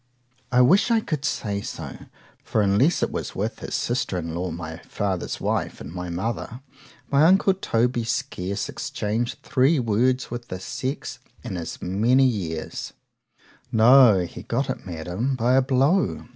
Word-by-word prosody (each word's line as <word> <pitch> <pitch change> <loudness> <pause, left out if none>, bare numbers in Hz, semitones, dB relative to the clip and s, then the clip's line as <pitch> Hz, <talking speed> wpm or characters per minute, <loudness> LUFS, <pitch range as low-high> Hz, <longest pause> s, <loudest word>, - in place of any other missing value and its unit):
I 125 0 +5
wish 185 - +5
I 230 -1 +4
could 155 -9 -3
say 100 -7 -2
so,—for 105 - -5
unless 105 - +3
it - - 0
was - - -4
with - - -3
his - - -4
sister 120 -6 -1
in 85 -2 -4
law, 90 +2 -2
my 80 -1 -6
father's 95 0 -3
wife - - -2
and - - -8
my 90 -1 -5
mother——my 125 - -3
uncle 190 +3 +5
Toby 120 -9 0
scarce 100 -5 -2
exchanged 110 +3 -3
three 135 +5 +3
words 125 +2 +1
with 120 0 -6
the 90 - -5
sex 130 +8 -4 0.2
in - - -5
as 85 -2 -6
many 115 +9 +3
years;——no, 110 +4 +1
he 85 0 -6
got 120 +6 -1
it, - - -7
Madam, 90 +10 -2
by 125 +1 +2
a 135 - +6
blow. 135 +8 +1
120 Hz, 145 wpm, -24 LUFS, 95-135 Hz, 0.2 s, a